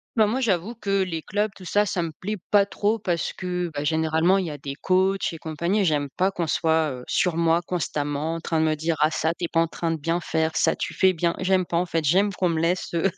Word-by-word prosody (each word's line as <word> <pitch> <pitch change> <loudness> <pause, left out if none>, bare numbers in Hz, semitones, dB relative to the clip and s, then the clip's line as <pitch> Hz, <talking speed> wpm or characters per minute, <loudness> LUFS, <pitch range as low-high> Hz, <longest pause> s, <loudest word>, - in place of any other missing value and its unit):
Bah, 220 -2 +4
moi, 250 +5 -1
j'avoue 205 0 0
que 195 -3 0
les 165 -4 -3
clubs, 210 +2 -1
tout 185 - -12
ça, 205 +3 +2
ça 175 -2 -1
me 165 - -4
plaît 205 +7 -5
pas 200 -1 +5
trop, 210 +2 0
parce 175 -5 -1
que, 180 -2 -3
bah, 145 - -3
généralement, 160 +4 +2
il 190 - -1
y 160 - -4
a 145 - -8
des 140 0 -6
coachs 190 +3 +1
et 165 - -8
compagnie, 170 +7 -1
et - - +2
j'aime 150 -3 +1
pas 190 +2 +3
qu'on 175 -3 -3
soit, 160 -1 +1
heu, 125 -1 -7
sur 175 -3 +1
moi 165 0 +2
constamment 155 -2 -2
en - - -4
train 165 -1 -1
de 160 - +3
me 155 -1 +1
dire: 160 +2 -1
«Ah, 155 - +4
ça, 160 0 0
tu 170 - -4
es - - -2
pas 165 - +2
en 165 - +1
train 165 +1 -3
de 165 - -1
bien 165 +3 -1
faire, 160 0 0
ça, - - +2
tu - - -4
fais 190 -1 +3
bien», 170 0 0
j'aime 185 0 +2
pas. 170 - -1
En 180 +1 0
fait, 165 -2 -1
j'aime 195 +7 +3
qu'on 180 -2 0
me 160 -1 0
laisse, 175 +2 -1
heu, 170 +3 +2
170 Hz, 280 wpm, -24 LUFS, 160-190 Hz, -, pas